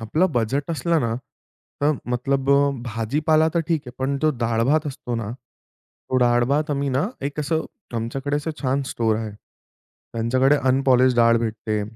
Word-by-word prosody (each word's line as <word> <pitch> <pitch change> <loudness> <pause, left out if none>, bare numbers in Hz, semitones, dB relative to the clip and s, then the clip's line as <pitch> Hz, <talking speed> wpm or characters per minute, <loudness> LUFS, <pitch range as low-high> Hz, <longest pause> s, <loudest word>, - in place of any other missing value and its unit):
आपलं 150 +11 +1
बजेट 135 +6 -1
असलं 165 0 +1
ना, 115 -3 -1 0.7
तर 145 +2 +3 0.2
मतलब 135 +2 0
अ, 140 0 +4 0.2
भाजीपाला 150 +8 +2
तर 170 - +3
ठीक 165 -3 +1
आहे. - - -6
पण 135 +1 0
जो 155 - +4
डाळ-भात 120 +7 +1
असतो 130 -3 -5
ना, 115 -3 -3
तो 125 +1 -10
डाळ 120 0 +3
भात 150 +2 +1
आम्ही 140 -1 0
ना, 135 +2 +1 0.2
1 145 +2 -3
असं, 160 +2 -1 0.3
आमच्याकडे 135 +5 -2
असं 150 +2 -3
छान 135 +1 +1
स्टोअर 110 -2 +1
आहे. 110 -1 -4 0.8
त्यांच्याकडे 130 +5 +2
अनपॉलिश्ड 130 -1 +4
डाळ 115 0 +5
भेटते. 110 -2 -2
130 Hz, 160 wpm, -23 LUFS, 115-145 Hz, 0.8 s, डाळ